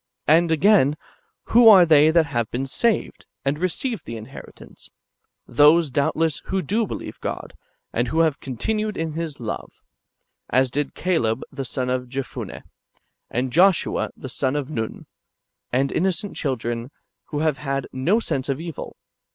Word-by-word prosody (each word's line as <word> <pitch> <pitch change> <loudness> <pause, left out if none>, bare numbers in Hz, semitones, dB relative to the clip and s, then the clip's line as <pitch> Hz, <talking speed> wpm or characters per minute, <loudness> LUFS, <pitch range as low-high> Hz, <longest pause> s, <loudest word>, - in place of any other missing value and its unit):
And 165 +2 +4
again, 160 -4 +4 0.5
who 235 0 +8
are 190 -5 +9
they 155 -1 +6
that 165 0 +4
have 120 -6 -2
been 130 +3 -3
saved, 220 - -1 0.2
and 140 +2 0
received 200 +6 -2
the 115 - -5
inheritance? 110 0 -12 0.6
Those, 150 +1 +4
doubtless, 150 +3 0
who 190 -1 -1
do 215 +7 0
believe - - -7
God, - - -5 0.4
and 120 +2 0
who 160 +6 +1
have 160 -4 +1
continued 210 - -2
in 160 -1 -2
His 160 -2 -4
love; 115 -3 -6 0.7
as 130 0 +2
did 145 +1 -2
Caleb 130 -11 0
[the 135 -1 -5
son] 125 0 -2
of 125 -1 -2
Jephunneh, 135 +1 -6 0.7
and 125 +1 -2
Joshua 185 +2 +3
[the 130 - -8
son] 130 +1 -1
of 145 0 -3
Nun,^ 110 -6 -4 0.7
and 135 +2 +1
innocent 190 +2 -1
children, 120 -3 -3 0.4
who 150 -1 -4
have 155 -3 0
had 135 -2 -2
no 165 - +2
sense 135 - -3
of 135 +1 -1
evil. 165 -1 -7
150 Hz, 150 wpm, -23 LUFS, 130-170 Hz, 0.7 s, are